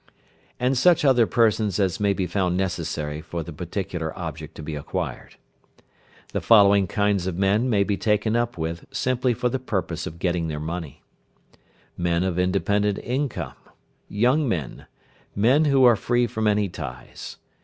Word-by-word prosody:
And 125 Hz, +2 st, +1 dB
such 165 Hz, +4 st, +4 dB
other 125 Hz, -5 st, +5 dB
persons 110 Hz, -4 st, +2 dB
as 95 Hz, -4 st, +1 dB
may 100 Hz, -1 st, +2 dB
be 95 Hz, -1 st, -1 dB
found 90 Hz, 0 st, 0 dB
necessary 80 Hz, -5 st, -3 dB
for 85 Hz, +1 st, -5 dB
the 85 Hz, -, -8 dB
particular 90 Hz, 0 st, -4 dB
object 80 Hz, -2 st, -7 dB
to 80 Hz, -, -8 dB
be 75 Hz, +1 st, -5 dB
acquired. 75 Hz, -1 st, -5 dB, 1.0 s
The -, -, -1 dB
following 100 Hz, -3 st, +5 dB
kinds 100 Hz, -1 st, 0 dB
of 90 Hz, -2 st, -3 dB
men 100 Hz, +6 st, +2 dB
may 100 Hz, -4 st, +3 dB
be 100 Hz, 0 st, -1 dB
taken 110 Hz, +2 st, +1 dB
up 120 Hz, -2 st, 0 dB
with 80 Hz, +1 st, -4 dB
simply 125 Hz, -1 st, 0 dB
for 125 Hz, -, 0 dB
the 130 Hz, +2 st, -1 dB
purpose 95 Hz, -8 st, -3 dB
of 80 Hz, -, -8 dB
getting 85 Hz, -1 st, -1 dB
their 75 Hz, -1 st, -4 dB
money. 80 Hz, -1 st, -6 dB, 0.9 s
Men 85 Hz, 0 st, 0 dB
of 90 Hz, -2 st, -1 dB
independent 100 Hz, +2 st, +1 dB
income. 125 Hz, -, -3 dB, 0.6 s
Young 125 Hz, +7 st, +2 dB
men. 80 Hz, -, -4 dB, 0.5 s
Men 125 Hz, +10 st, +4 dB
who 140 Hz, -2 st, +4 dB
are 120 Hz, -2 st, +7 dB
free 120 Hz, +4 st, +1 dB
from 110 Hz, -2 st, -2 dB
any 105 Hz, -1 st, +2 dB
ties. 60 Hz, -8 st, -8 dB
100 Hz, 160 wpm, -24 LUFS, 85-115 Hz, 1.0 s, are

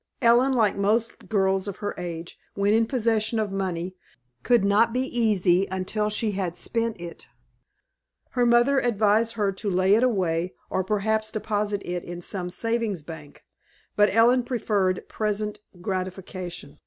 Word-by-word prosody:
Ellen, 245 Hz, +2 st, +4 dB
like 220 Hz, -5 st, +2 dB
most 215 Hz, +4 st, 0 dB
girls 195 Hz, -2 st, +1 dB
of 200 Hz, -, -4 dB
her 205 Hz, -, -3 dB
age, 170 Hz, -1 st, -7 dB, 0.2 s
when 200 Hz, +1 st, +2 dB
in 225 Hz, 0 st, +3 dB
possession 225 Hz, -2 st, 0 dB
of 215 Hz, -2 st, -1 dB
money, 185 Hz, -2 st, -3 dB, 0.5 s
could 240 Hz, -5 st, +3 dB
not 210 Hz, +3 st, +4 dB
be 250 Hz, -, +1 dB
easy 200 Hz, -7 st, +2 dB
until 190 Hz, +3 st, -1 dB
she 215 Hz, +1 st, -1 dB
had 190 Hz, -3 st, -3 dB
spent 230 Hz, -1 st, -1 dB
it. 170 Hz, -1 st, -9 dB, 1.0 s
Her 245 Hz, -, +1 dB
mother 240 Hz, +3 st, +4 dB
advised 225 Hz, -1 st, +2 dB
her 205 Hz, -3 st, 0 dB
to 200 Hz, +2 st, -4 dB
lay 185 Hz, +1 st, +3 dB
it 220 Hz, -, +4 dB
away, 185 Hz, -8 st, 0 dB, 0.2 s
or 190 Hz, -, 0 dB
perhaps 215 Hz, +2 st, 0 dB
deposit 210 Hz, -2 st, -2 dB
it 175 Hz, 0 st, -3 dB
in 175 Hz, 0 st, -7 dB
some 180 Hz, 0 st, -3 dB
Savings 225 Hz, -2 st, -2 dB
Bank; 150 Hz, -2 st, -11 dB, 0.5 s
but 205 Hz, 0 st, +4 dB
Ellen 235 Hz, +4 st, +5 dB
preferred 205 Hz, -7 st, -1 dB
present 210 Hz, -1 st, -2 dB, 0.2 s
gratification. 185 Hz, -5 st, -5 dB
205 Hz, 150 wpm, -25 LUFS, 185-225 Hz, 1.0 s, Ellen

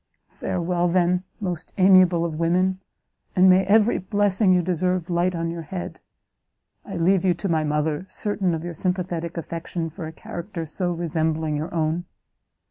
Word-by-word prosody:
"Farewell, 175 Hz, 0 st, -1 dB
then, 180 Hz, +1 st, +2 dB
most 180 Hz, -6 st, -4 dB
amiable 185 Hz, -3 st, +5 dB
of 160 Hz, -2 st, -4 dB
women, 185 Hz, +3 st, +1 dB, 0.6 s
and 185 Hz, +1 st, +6 dB
may 185 Hz, +1 st, +6 dB
every 215 Hz, +3 st, +4 dB
blessing 200 Hz, +1 st, +2 dB
you 180 Hz, -1 st, +3 dB
deserve 180 Hz, 0 st, -1 dB
light 175 Hz, +1 st, +1 dB
on 165 Hz, 0 st, -2 dB
your 170 Hz, 0 st, -5 dB
head! 175 Hz, +3 st, -6 dB, 0.8 s
I 195 Hz, -, -7 dB
leave 180 Hz, +2 st, +3 dB
to 190 Hz, -, 0 dB, 0.2 s
you -, -, -1 dB
my 160 Hz, -1 st, +2 dB
mother, 150 Hz, +2 st, -1 dB
certain 195 Hz, -5 st, -1 dB
of 160 Hz, -, -5 dB
your 175 Hz, 0 st, -5 dB
sympathetic 175 Hz, -1 st, -2 dB
affection 165 Hz, 0 st, -4 dB
for 165 Hz, 0 st, -7 dB
a -, -, -7 dB
character 170 Hz, +1 st, -6 dB
so 175 Hz, +3 st, -2 dB
resembling 160 Hz, -2 st, -1 dB
your 155 Hz, +4 st, -3 dB
own. 165 Hz, +1 st, -1 dB
175 Hz, 160 wpm, -23 LUFS, 165-185 Hz, 0.8 s, and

